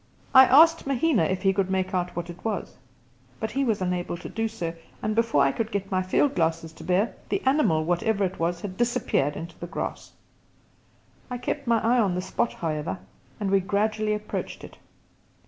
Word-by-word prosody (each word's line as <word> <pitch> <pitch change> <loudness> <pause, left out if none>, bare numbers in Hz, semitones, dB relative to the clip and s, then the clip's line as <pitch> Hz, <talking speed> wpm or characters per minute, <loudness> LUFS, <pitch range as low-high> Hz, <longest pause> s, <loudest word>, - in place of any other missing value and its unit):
I 260 0 +10
asked 325 +4 +6
Mahina 275 - +2
if 185 +3 -2
he 195 -1 +4
could 195 -1 0
make 190 0 -1
out 180 -1 -1
what 175 0 -4
it 170 - -14
was, 215 -5 -3 0.6
but 220 0 -3
he 275 - 0
was 220 -7 0
unable 180 -1 -2
to - - -8
do 225 0 -1
so, 175 -7 -4 0.3
and 215 - -1
before 225 -11 +3
I 140 - +3
could 225 +5 -3
get 200 -2 -3
my 185 -1 +2
field 225 +9 +2
glasses 165 - -1
to - - -12
bear, 190 +5 +1 0.2
the - - +1
animal, 260 - +3
whatever 200 +5 +1
it 185 -1 -2
was, 170 +1 -1
had 190 -2 -6
disappeared 240 - +1
into 165 +1 -8
the 175 - -6
grass. - - -5 1.2
I 250 - -3
kept 265 +3 -4
my 230 -1 +4
eye 240 +2 +3
on 195 -6 +2
the 180 - -1
spot, 235 - -1
however, 150 - -3 0.4
and 200 -2 -1
we 195 - +5
gradually 210 +2 0
approached 210 0 -5
it. - - -12
195 Hz, 200 wpm, -26 LUFS, 175-230 Hz, 1.2 s, I